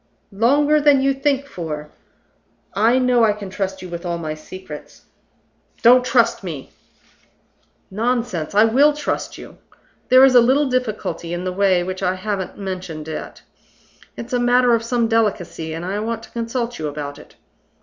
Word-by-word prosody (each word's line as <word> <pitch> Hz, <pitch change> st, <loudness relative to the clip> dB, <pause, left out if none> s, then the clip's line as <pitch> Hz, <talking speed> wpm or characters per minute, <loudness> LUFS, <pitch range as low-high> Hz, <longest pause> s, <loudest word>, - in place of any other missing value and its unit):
"Longer 285 Hz, +8 st, +3 dB
than 285 Hz, -2 st, +5 dB
you 275 Hz, 0 st, +3 dB
think 275 Hz, 0 st, 0 dB
for. 155 Hz, -, -6 dB, 0.8 s
I 225 Hz, +5 st, +3 dB
know 250 Hz, -2 st, +3 dB
I 215 Hz, -2 st, +4 dB
can 205 Hz, -2 st, -8 dB
trust 190 Hz, -1 st, -4 dB
you 185 Hz, -, -8 dB
with 170 Hz, 0 st, -6 dB
all 170 Hz, -1 st, -2 dB
my 155 Hz, -2 st, -4 dB
secrets 155 Hz, 0 st, -11 dB, 0.4 s
" -, -, -37 dB
"Don't 250 Hz, +2 st, +7 dB
trust 235 Hz, -4 st, +2 dB
me!" 155 Hz, -7 st, -7 dB, 1.2 s
"Nonsense! 225 Hz, -6 st, -2 dB
I 210 Hz, -, +7 dB
will 270 Hz, +7 st, +4 dB
trust 295 Hz, -, -3 dB
you. -, -, -12 dB, 0.5 s
There 255 Hz, +1 st, +8 dB
is 265 Hz, -, +4 dB
a 245 Hz, -, +8 dB
little 265 Hz, +5 st, +3 dB
difficulty 215 Hz, -9 st, -2 dB
in 175 Hz, -, -5 dB
the 185 Hz, 0 st, -3 dB
way 190 Hz, -2 st, +2 dB
which 185 Hz, +1 st, -5 dB
I 185 Hz, -1 st, 0 dB
haven't 190 Hz, -1 st, -4 dB
mentioned 180 Hz, -5 st, -6 dB
yet. 160 Hz, -, -7 dB, 0.7 s
It's 235 Hz, +2 st, -7 dB
a 245 Hz, -, +2 dB
matter 245 Hz, 0 st, +4 dB
of 230 Hz, -, +2 dB
some 235 Hz, 0 st, 0 dB
delicacy, 200 Hz, -8 st, -1 dB
and 165 Hz, +2 st, -5 dB
I 195 Hz, +3 st, -2 dB
want 225 Hz, +1 st, -3 dB
to -, -, -14 dB
consult 235 Hz, 0 st, -3 dB
you 155 Hz, -, -2 dB
about 145 Hz, -1 st, -6 dB
it. -, -, -16 dB
215 Hz, 170 wpm, -20 LUFS, 180-250 Hz, 1.2 s, There